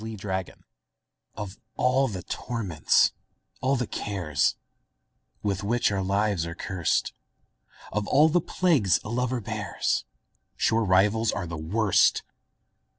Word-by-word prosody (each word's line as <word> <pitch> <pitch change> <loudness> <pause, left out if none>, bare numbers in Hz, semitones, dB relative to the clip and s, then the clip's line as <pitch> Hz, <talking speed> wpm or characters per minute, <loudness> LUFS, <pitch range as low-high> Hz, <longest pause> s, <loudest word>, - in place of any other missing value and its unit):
Y 110 0 -5
Z - - -10
Rivals 95 -1 -3 0.8
OF 105 -1 -7 0.2
all 130 +2 +2
the 95 -6 -5
torments, 105 -10 +1 0.5
all 135 +1 +2
the 125 -1 -1
cares, 85 -11 -1 0.9
With 100 -1 -1
which 120 +2 +1
our 100 -1 0
lives 100 -1 +1
are 85 - -6
curst; 90 -2 -1 0.8
Of 105 0 -2
all 150 +3 +5
the 170 +2 +2
plagues 155 - +2
a - - -7
lover 125 +1 -1
bears, 105 -2 -2 0.5
Sure 115 0 +2
rivals 105 +3 +3
are 95 - -3
the 85 0 -6
worst! 95 +6 +2
105 Hz, 130 wpm, -26 LUFS, 95-115 Hz, 0.9 s, all